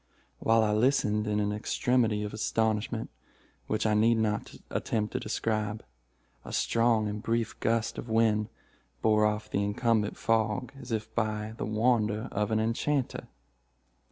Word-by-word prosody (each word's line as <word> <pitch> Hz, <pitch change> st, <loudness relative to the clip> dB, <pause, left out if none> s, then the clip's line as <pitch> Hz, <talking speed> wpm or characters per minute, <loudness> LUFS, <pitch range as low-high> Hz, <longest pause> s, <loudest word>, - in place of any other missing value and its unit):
"While 115 Hz, 0 st, +3 dB
I 105 Hz, -, +2 dB
listened 105 Hz, -2 st, +2 dB
in 105 Hz, 0 st, +1 dB
an 105 Hz, 0 st, 0 dB
extremity 110 Hz, 0 st, +1 dB
of 105 Hz, -, -5 dB
astonishment 110 Hz, +1 st, -1 dB, 0.6 s
which 110 Hz, 0 st, -1 dB
I 110 Hz, -, +3 dB
need 115 Hz, +2 st, +4 dB
not 105 Hz, -1 st, -1 dB, 0.2 s
attempt 105 Hz, -1 st, -1 dB
to -, -, 0 dB
describe, 110 Hz, 0 st, -2 dB, 0.6 s
a -, -, -9 dB
strong 115 Hz, -2 st, +2 dB
and 105 Hz, 0 st, -4 dB
brief 115 Hz, 0 st, -1 dB
gust 115 Hz, 0 st, 0 dB
of 120 Hz, -, -7 dB
wind 110 Hz, -1 st, +2 dB, 0.5 s
bore 105 Hz, -1 st, +4 dB
off 105 Hz, 0 st, -2 dB
the 100 Hz, -, +1 dB
incumbent 105 Hz, +1 st, +1 dB
fog 115 Hz, +3 st, 0 dB
as 125 Hz, -1 st, -9 dB
if 110 Hz, -1 st, -3 dB
by 110 Hz, -1 st, -1 dB
the -, -, -3 dB
wand 110 Hz, 0 st, +2 dB
of 105 Hz, -1 st, -2 dB
an 110 Hz, 0 st, +1 dB
enchanter. 120 Hz, +5 st, -1 dB
110 Hz, 150 wpm, -29 LUFS, 105-115 Hz, 0.6 s, need